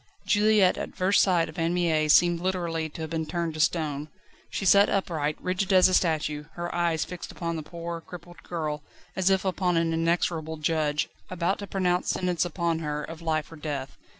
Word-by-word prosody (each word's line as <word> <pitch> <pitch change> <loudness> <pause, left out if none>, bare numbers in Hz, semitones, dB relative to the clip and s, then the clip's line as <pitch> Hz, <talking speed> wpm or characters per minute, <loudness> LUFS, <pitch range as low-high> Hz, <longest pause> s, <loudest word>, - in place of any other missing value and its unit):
Juliette 210 -2 +4
at - - -6
first 190 +2 +3
sight 175 -4 +3
of 155 - -8
Anne 165 +1 +1
Mie 160 -3 +2
seemed 175 +2 +5
literally 170 -3 -2
to 155 - -9
have 160 0 -5
been 160 -1 -2
turned 170 -1 -2
to 155 - -7
stone. 155 -2 0 0.4
She 195 - -3
sat 200 +2 +6
upright, 160 -6 -1
rigid 185 +2 -1
as 185 -1 +7
a 185 - -1
statue, 155 -4 +1
her 175 0 -4
eyes 170 -2 +1
fixed 180 -1 -8
upon 170 -1 -3
the 160 - -3
poor, 170 +1 -6
crippled 175 0 -12
girl 155 -3 -3 0.3
as 190 0 +2
if 190 0 +2
upon 180 -2 +1
an 165 0 +1
inexorable 165 -1 0
judge, 150 -1 0 0.2
about 180 +1 -1
to 200 - -6
pronounce 180 -2 0
sentence 180 -2 0
upon 170 -1 -1
her 150 -2 -3
of 165 +2 -8
life 160 -1 -1
or 165 - -10
death. 145 -3 -5
170 Hz, 195 wpm, -27 LUFS, 155-180 Hz, 0.4 s, as